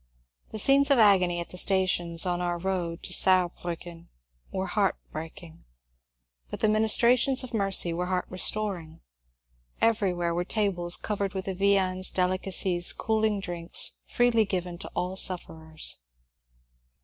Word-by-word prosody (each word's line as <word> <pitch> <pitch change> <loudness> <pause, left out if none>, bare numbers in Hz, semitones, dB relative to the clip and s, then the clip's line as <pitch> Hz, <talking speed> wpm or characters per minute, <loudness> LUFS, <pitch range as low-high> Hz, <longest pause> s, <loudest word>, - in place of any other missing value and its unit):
The - - -7
scenes 275 +6 +3
of 280 - +4
agony 185 -5 +4
at 170 - -8
the 180 - -2
stations 180 -3 +2
on 175 -1 -1
our 175 -1 -1
road 175 -2 -3
to 180 - -4
Saar 185 -2 +4
briicken 170 -1 -8 0.4
were 190 0 -3
heart 200 -1 0 0.2
breaking, 160 +1 -9 0.9
but - - -6
the - - +2
ministrations 235 +5 +3
of 255 - -9
mercy 195 -5 +3
were 180 +2 -3
heart 185 0 -1
restoring. 185 -4 -2 0.8
Everywhere 180 -6 0
were 175 +1 -1
tables 180 -4 0
covered 200 -2 -4
with 190 - -4
the 195 - -3
viands, 185 -1 +1
delicacies, 185 -1 0
cooling 220 -2 -1
drinks, 175 -2 -4 0.2
freely 240 -2 +2
given 180 -3 -4
to - - -7
all 180 +1 -2
sof 185 -2 +2
ferers. 160 -1 -11
185 Hz, 140 wpm, -27 LUFS, 175-205 Hz, 0.9 s, of